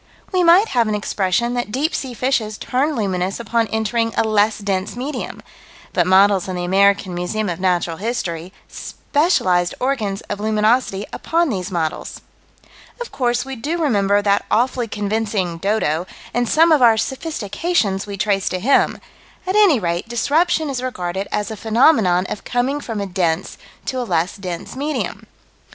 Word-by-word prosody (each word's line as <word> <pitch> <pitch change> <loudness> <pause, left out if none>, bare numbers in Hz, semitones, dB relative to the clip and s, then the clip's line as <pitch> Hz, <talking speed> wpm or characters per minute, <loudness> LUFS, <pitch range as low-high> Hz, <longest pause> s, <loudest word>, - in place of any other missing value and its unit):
We 365 -2 +2
might 355 +6 +6
have 235 -3 +2
an 215 - 0
expression 205 +3 0
that 245 -3 -3
deep 285 +7 0
sea 255 -3 -4
fishes 230 -4 -1
turn 280 +4 -1
luminous 190 -3 -1
upon 230 -1 0
entering 225 +1 -1
a - - +4
less 215 0 +2
dense 195 -1 -2
medium 270 +5 -5 0.5
but - - +2
models 195 0 +4
in 185 - -4
the 175 - -3
American 195 0 +3
Museum 180 +5 -2
of 170 - -4
Natural 175 -3 0
History: 185 -6 -3 0.2
specialized 185 - 0
organs 225 -7 -1
of 205 - -6
luminosity 215 -1 +1
upon 335 0 0
these 185 -6 -3
models. 165 -4 -3 0.8
Of 485 - -6
course 245 0 0
we 270 0 -6
do 295 +8 -3
remember 205 -9 +2
that 200 0 +2
awfully 245 0 +1
convincing 205 -4 -2
"dodo," 180 -4 0 0.3
and 245 -1 0
some 325 +2 +5
of 305 -4 +5
our 230 -2 +6
sophistications 220 - -1
we 200 -1 -6
trace 195 -1 0
to 185 - -3
him 270 +9 +2 0.5
at 375 +1 -1
any 400 - +5
rate 175 +3 -2
disruption 310 +7 +1
is 265 -3 -3
regarded 190 -6 -3
as 210 +1 -2
a - - -4
phenomenon 220 - +3
of - - -6
coming 260 +4 -1
from 225 -6 -4
a - - -2
dense 175 -2 -1 0.3
to 260 - -2
a - - -1
less 175 -6 -1
dense 180 -1 -6
medium. 295 +3 -3
215 Hz, 165 wpm, -20 LUFS, 190-255 Hz, 0.8 s, might